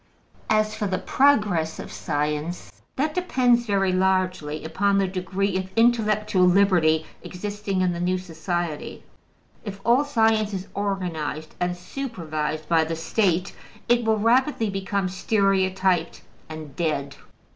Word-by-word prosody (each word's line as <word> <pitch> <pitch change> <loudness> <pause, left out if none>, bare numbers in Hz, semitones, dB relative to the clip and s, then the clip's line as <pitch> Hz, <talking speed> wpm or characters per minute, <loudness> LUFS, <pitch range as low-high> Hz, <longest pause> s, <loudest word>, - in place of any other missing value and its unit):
As 215 0 +2
for 215 -1 -2
the 185 -1 -1
progress 205 - +2
of - - -8
science, 150 +3 -3 0.2
that 300 +3 0
depends 250 -9 +2
very 195 -2 +1
largely 185 -5 0
upon 200 +5 +1
the 195 -1 +2
degree 190 +1 -2
of 190 0 -4
intellectual 215 -4 +3
liberty 175 -5 +3 0.2
existing 205 0 -4
in 180 -1 +1
the 170 - -5
new 180 +1 +1
society. 175 -2 -4 0.6
If 200 -2 -7
all 240 +5 +4
science 220 -6 +2
is 190 0 -5
organized 175 -6 -3
and 180 0 -1
supervised 160 - -4
by 165 -1 +3
the 165 +1 -3
State, 180 +2 0 0.3
it 240 0 +3
will 220 -1 +2
rapidly 230 0 +2
become 195 0 -1
stereotyped 190 -2 +1 0.3
and 155 -3 -8
dead. 145 -4 -1
190 Hz, 130 wpm, -24 LUFS, 170-215 Hz, 0.6 s, all